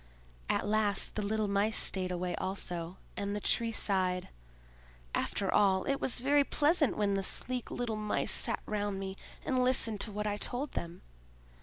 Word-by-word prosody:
At - - +1
last 210 -1 +1
the 215 - -2
little 215 +1 0
Mice 200 +2 +1
stayed 185 -1 +2
away 180 0 -2
also; 180 -2 -3 0.2
and 200 0 -2
the - - -1
Tree 230 +2 +1
sighed: 185 -4 +1 0.8
"After 195 -2 -1
all, 190 -2 +4
it 275 0 -1
was 245 - +1
very 285 +2 +4
pleasant 295 0 +2
when 205 -1 +1
the 195 - +1
sleek 250 +5 0
little 235 -3 -3
Mice 210 0 0
sat - - +1
round 205 -2 -2
me 190 0 -5 0.3
and 255 -1 +2
listened 230 -5 +2
to 220 - -2
what 210 +1 -3
I 205 -1 -1
told 255 +6 -2
them. 170 +1 -6
205 Hz, 170 wpm, -32 LUFS, 195-235 Hz, 0.8 s, all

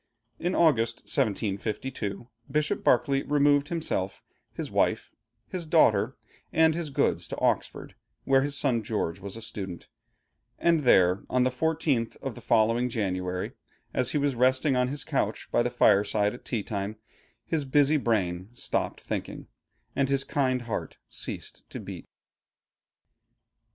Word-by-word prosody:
In 175 +2 -1
August, 120 -8 +3
1752, 110 -1 -2 0.2
Bishop 150 0 0
Berkeley 135 +3 +3
removed 145 0 +3
himself, 150 - -2 0.3
his - - -6
wife, - - +1 0.4
his 180 -3 -5
daughter, 120 -7 +3 0.3
and 160 0 +4
his 165 -1 -3
goods 140 0 0
to - - -6
Oxford, - - -1 0.3
where 135 0 +4
his 145 +1 -1
son 125 -5 +1
George 100 -5 -2
was 100 +2 -7
a 115 - -7
student; 95 -6 -5 0.7
and 165 -3 +2
here 95 -4 +5
on 125 0 +2
the 130 - +2
fourteenth 145 -4 0
of 135 - -4
the 120 - -11
following 115 +2 +2
January, 90 -5 -2 0.4
as 125 -1 +1
he - - 0
was 145 -1 +1
resting 130 +3 +3
on 125 0 +2
his 140 +3 -3
couch - - -1
by - - +3
the - - +1
fireside 105 +1 +3
at 120 - -12
tea 115 -5 -2
time, 100 +1 -3 0.5
his 160 -3 -1
busy 145 +2 +4
brain 95 -7 0
stopped - - -2
thinking, - - -5 0.5
and 140 -1 +1
his 140 0 +2
kind 130 -4 0
heart 115 -3 -4
ceased - - -6
to - - -6
beat. - - -8
125 Hz, 145 wpm, -27 LUFS, 105-145 Hz, 0.7 s, here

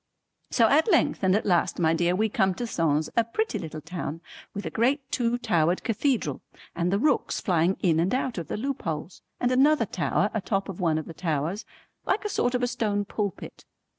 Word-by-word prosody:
So 230 -2 +4
at 310 - +3
length 335 - +2
and 190 -1 +3
at 210 - 0
last 175 -2 +2
my 165 -2 +3
dear 175 +2 +1
we 215 +3 +2
come 190 -3 +1
to 240 - -3
Sens, 160 -7 0
a 230 - +4
pretty 435 - -2
little 155 -1 -7
town 165 0 -5 0.3
with 200 - -6
a - - -3
great 260 +6 +2
two 240 -1 +1
towered 175 -7 +1
cathedral 245 +2 0 0.3
and 175 +1 0
the 200 - +2
rooks 280 +5 +1
flying 175 0 +1
in 165 -4 +3
and 175 +3 +1
out 255 -5 -1
of 170 - -6
the - - -3
loopholes 190 - -4 0.2
and 245 - +1
another 270 0 +4
tower 205 +1 0
atop 195 -2 -1
of 195 - -6
one 165 -4 +1
of 155 - -3
the 165 - -9
towers 165 +5 -2 0.4
like 415 +2 -1
a - - 0
sort 245 -10 0
of 250 - 0
a - - +3
stone 205 -4 -1
pulpit. 205 -2 -5
200 Hz, 205 wpm, -26 LUFS, 170-245 Hz, 0.4 s, So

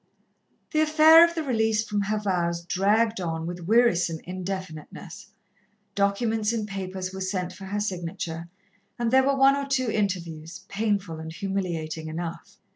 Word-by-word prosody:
The 310 - +2
affair 310 +1 +8
of 340 0 +2
the 325 - -1
release 220 -4 +1
from 205 -1 0
her 210 +2 -1
vows 170 -4 -1
dragged 210 +4 +2
on 165 -2 -3
with 175 0 -6
wearisome 205 -7 +3
indefiniteness. 185 -1 -7 0.7
Documents 210 +2 +1
and 220 -3 -2
papers 190 -2 -5
were 190 - -6
sent 185 -1 -2
for 190 +1 -10
her 205 +2 -3
signature, 170 -4 -4 0.5
and 235 -1 0
there 265 +1 +6
were 275 +1 +2
one 270 +1 +6
or 280 0 -3
two 255 -4 0
interviews, 175 -5 -3
painful 200 -6 -1
and 160 0 -7
humiliating 165 -4 -3
enough. 170 +5 -6
195 Hz, 150 wpm, -26 LUFS, 175-225 Hz, 0.7 s, affair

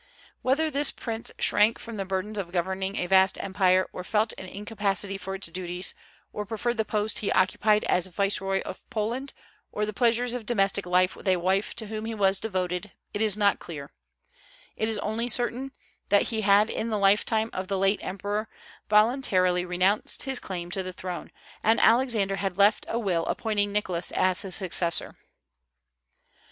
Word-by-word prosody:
Whether 305 +5 +1
this 285 0 +4
prince 230 -1 -5
shrank 215 +3 +3
from 230 -2 -8
the 195 - -3
burdens 195 +3 -3
of 175 -3 -5
governing 190 +2 -2
a 180 - -1
vast 190 +1 +4
empire, 185 -1 +2
or 180 - -6
felt 215 +3 0
an 190 - -7
incapacity 200 -1 -2
for 195 0 -5
its 195 - -6
duties, 180 +1 -1 0.4
or 210 - -3
preferred 230 +3 -2
the 220 - +2
post 210 0 0
he 205 - -1
occupied 210 +3 +2
as 180 0 +1
Viceroy 195 +1 0
of - - -8
Poland 240 +4 -3 0.4
or 210 - -1
the 215 - -5
pleasures 240 +2 +2
of 240 -4 -5
domestic 195 -4 +1
life 180 +1 +2
with - - -11
a 185 - +4
wife 190 +3 0
to 230 - -3
whom 215 +1 -5
he 225 0 -4
was 195 -2 +2
devoted, 185 -2 -3 0.2
it 205 - -2
is 215 -2 +1
not 205 -1 +2
clear; 145 -4 -8 0.8
it 220 - -1
is 220 - -1
only 220 +4 -2
certain 245 +3 +1 0.4
that 200 0 +3
he 220 -2 -1
had 205 +1 +4
in 230 - -2
the 215 - 0
lifetime 210 +3 +2
of 185 0 -4
the 195 - -1
late 195 +2 +1
emperor 205 +3 -3 0.4
voluntarily 210 -5 +3
renounced 185 +4 +1
his 265 -2 -1
claim 175 -2 -6
to 190 - 0
the 185 0 -5
throne, 180 -1 -6 0.3
and 225 +2 +3
Alexander 225 -5 +3
had 195 -2 -3
left 205 +1 +3
a 230 - -1
will 185 -7 0
appointing 205 -2 0
Nicholas 185 -4 -1
as 185 -1 +3
his 190 -2 -2
successor. 175 -3 +1
200 Hz, 180 wpm, -26 LUFS, 185-220 Hz, 0.8 s, this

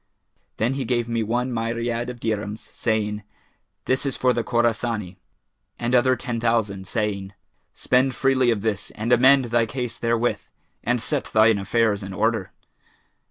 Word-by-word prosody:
Then 115 +4 +1
he 135 0 -2
gave 120 -1 0
me 115 -1 -1
one 120 +3 -1
myriad 115 +1 -2
of 125 -1 -7
dirhams, 110 -1 -4
saying, 105 -2 -1 0.6
'This 130 +2 +1
is 135 - -2
for 125 -1 +3
the 120 0 -1
Khorasani,' 115 -5 -1 0.6
and 120 +1 -2
other 130 +1 +4
ten 120 -1 -4
thousand, 110 -5 0
saying, 100 -2 -2 0.4
'Spend 130 0 +2
freely 130 -1 +2
of 110 -4 +1
this 105 -2 -1
and 115 +3 -3
amend 130 +2 +6
thy 120 -1 +2
case 125 -1 -4
therewith, 115 +1 0 0.4
and 125 0 +1
set 140 +4 -1
thine 110 -1 +4
affairs 110 0 +1
in 95 -1 -7
order.' - - 0
115 Hz, 155 wpm, -23 LUFS, 110-125 Hz, 0.6 s, amend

